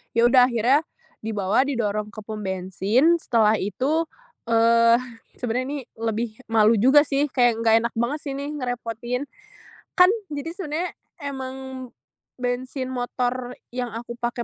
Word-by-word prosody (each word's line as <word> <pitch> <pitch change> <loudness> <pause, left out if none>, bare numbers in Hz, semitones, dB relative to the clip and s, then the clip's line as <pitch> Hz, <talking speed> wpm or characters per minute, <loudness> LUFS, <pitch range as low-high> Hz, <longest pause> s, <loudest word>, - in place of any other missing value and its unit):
Ya 230 - +4
udah 250 +1 +6
akhirnya 245 +3 +3 0.4
dibawa 215 +4 0
didorong 210 -5 -1
ke 215 - -8
pom 215 0 -6
bensin 195 - +1
setelah 220 -6 +2
itu, 275 - 0 0.4
eee, 230 0 +5 0.4
sebenernya 250 +2 -2
ini - - -3 0.2
lebih 225 0 -2
malu 225 0 +4
juga 270 +6 +6
sih, 285 0 0
kayak 245 -3 +2
nggak 225 -1 +4
enak 235 - -2
banget 265 +6 0
sih 280 - -4
nih 285 +1 -4
ngerepotin. 245 -2 -3 0.8
Kan 365 +3 +7 0.2
jadi 300 +3 -5
sebenernya 350 -1 -3 0.2
emang 265 -2 -6 0.5
bensin 255 +1 -3
motor 250 0 -2 0.2
yang 250 0 -3
aku 235 +1 -7
pakai 240 0 -2
245 Hz, 135 wpm, -24 LUFS, 225-265 Hz, 0.8 s, Kan